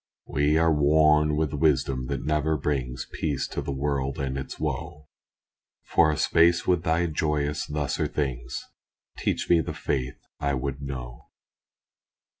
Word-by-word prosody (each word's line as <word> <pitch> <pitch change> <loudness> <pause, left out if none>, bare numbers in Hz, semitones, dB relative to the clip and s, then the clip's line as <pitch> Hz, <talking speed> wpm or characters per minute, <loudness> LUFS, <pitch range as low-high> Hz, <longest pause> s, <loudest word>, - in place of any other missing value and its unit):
We 75 +2 +2
are 80 0 +4
worn 75 0 +4
with 75 -1 0
wisdom 70 -4 +1
that - - -3
never 75 0 +1
brings 65 -4 -2
Peace 75 -5 -1
to - - -3
the 70 0 -4
world 70 -1 -1
and 70 -1 -2
its 65 -1 -6
woe 75 0 -4 0.7
For 80 -2 +3
a 75 - -2
space 85 +1 +4
with 90 -3 +2
Thy 80 +1 +1
joyous 75 -2 -1
lesser 75 -3 -1
things, 65 -3 -3 0.5
Teach - - -1
me 85 -1 +5
the - - -5
faith 65 -3 -2 0.2
I 70 -1 0
would 70 +1 -3
know. 65 -3 -7
75 Hz, 145 wpm, -26 LUFS, 65-75 Hz, 0.7 s, me